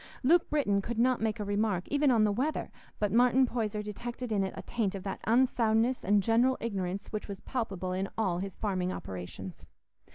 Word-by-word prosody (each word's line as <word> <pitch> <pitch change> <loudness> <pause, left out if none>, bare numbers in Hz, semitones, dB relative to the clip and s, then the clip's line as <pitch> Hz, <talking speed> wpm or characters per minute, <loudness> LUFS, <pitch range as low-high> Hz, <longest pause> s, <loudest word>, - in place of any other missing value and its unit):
Luke 330 +6 +4
Britton 205 -10 +2
could 235 +3 -5
not 250 +1 +3
make 220 0 -1
a - - -1
remark, 205 -2 0
even 290 0 +3
on 230 -4 +4
the 210 - +3
weather, 265 +9 -1 0.3
but 210 -2 0
Martin 250 +3 +5
Poyser 215 -4 -2
detected 235 +3 -6
in 200 -2 +2
it 190 - -2
a - - -6
taint 220 -5 -1
of 190 - -6
that 195 - -4
unsoundness 235 0 +2
and 205 0 +3
general 240 +4 +3
ignorance 195 -3 -3
which 215 -2 -4
was 200 -1 -7
palpable 195 -7 -3
in 190 +1 -2
all 185 -6 0
his 195 -1 -5
farming 185 -3 -1
operations. 95 - -7
215 Hz, 195 wpm, -30 LUFS, 195-240 Hz, 0.3 s, Martin